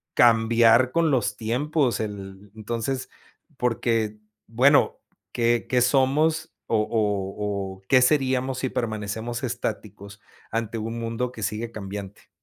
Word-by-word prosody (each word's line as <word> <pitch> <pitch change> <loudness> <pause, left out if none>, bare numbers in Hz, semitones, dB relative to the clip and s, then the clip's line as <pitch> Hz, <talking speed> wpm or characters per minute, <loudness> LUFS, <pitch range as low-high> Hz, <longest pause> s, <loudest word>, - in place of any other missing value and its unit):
cambiar 115 +1 +5
con 165 -1 +2
los 105 -5 0
tiempos, 130 +4 0
el 100 -2 -7
entonces 115 +4 -3 0.5
porque, 115 -3 0 0.3
bueno, 130 +6 +3 0.3
¿qué 120 0 +1
qué 125 -1 +3
somos, 145 +5 +2 0.2
o 115 - +2
o 105 -2 -1 0.3
o - - -27
qué 130 - +5
seríamos 130 -1 +2
si 130 - -1
permanecemos 110 +1 -3
estáticos 105 -4 -5 0.3
ante 115 0 -2
un 115 +2 -4
mundo 115 +2 -2
que 110 -3 -8
sigue 110 +3 -3
cambiante? 100 -2 -8
115 Hz, 120 wpm, -24 LUFS, 105-130 Hz, 0.5 s, cambiar